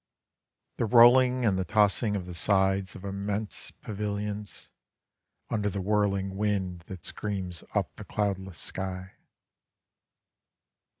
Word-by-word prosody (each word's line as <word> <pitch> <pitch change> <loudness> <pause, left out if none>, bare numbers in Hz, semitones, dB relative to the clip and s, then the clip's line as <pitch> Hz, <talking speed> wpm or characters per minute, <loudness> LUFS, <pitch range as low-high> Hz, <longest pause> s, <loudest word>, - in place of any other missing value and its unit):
The 115 - 0
rolling 125 +2 +6
and 95 -4 +2
the - - +1
tossing 105 +3 +2
of 95 -3 -3
the 90 - -7
sides 95 +1 +2
of 95 - -9
immense 100 +2 -3
pavilions 105 0 -5 0.8
Under 105 -2 +1
the 100 - -3
whirling 100 -1 +1
wind 100 -4 -1
that 95 -3 -9
screams 95 -5 -4
up - - 0
the - - -7
cloudless 95 -4 -2
sky. 95 +1 -5
100 Hz, 115 wpm, -28 LUFS, 95-105 Hz, 0.8 s, rolling